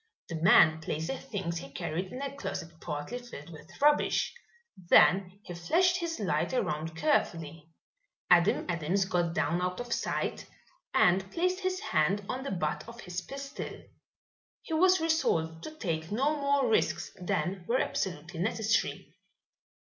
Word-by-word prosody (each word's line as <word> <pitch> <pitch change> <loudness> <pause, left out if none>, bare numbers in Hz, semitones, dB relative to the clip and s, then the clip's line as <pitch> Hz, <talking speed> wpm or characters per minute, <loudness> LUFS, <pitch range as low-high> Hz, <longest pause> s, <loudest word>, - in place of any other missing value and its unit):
The 165 -2 -4
man 160 -2 +6
placed 160 +1 -3
the 270 - -2
things 190 -9 -4
he 135 - -9
carried 165 +6 -4
in 260 +2 -5
a 280 0 -4
closet 165 -11 -5
partly 150 +10 -4
filled 170 -10 -10
with 165 +2 -13
rubbish. 295 +1 +3 0.4
Then 185 +1 +4
he 175 - -8
flashed 350 - +2
his 335 -2 -3
light 175 -1 0
around 160 -8 -2
carefully. 165 - 0 0.6
Adam 175 +3 +4
Adams 175 +3 0
got 175 -3 0
down 175 +1 +1
out 180 +2 -2
of 245 -1 -3
sight - - -2 0.4
and 190 +2 +3
placed 365 +2 0
his 370 -1 -1
hand 185 +6 +1
on 255 +4 -3
the 275 - -4
butt 160 -4 -2
of 235 0 -10
his 180 0 -5
pistol. 275 +6 -6 0.9
He 325 - -6
was 370 +3 +5
resolved 165 - 0
to - - -6
take 165 - -3
no 275 +8 +1
more 280 -2 +2
risks 175 -5 +1
than 185 0 -1
were 240 - +2
absolutely 175 - -3
necessary. 220 +3 0
190 Hz, 150 wpm, -30 LUFS, 165-270 Hz, 0.9 s, man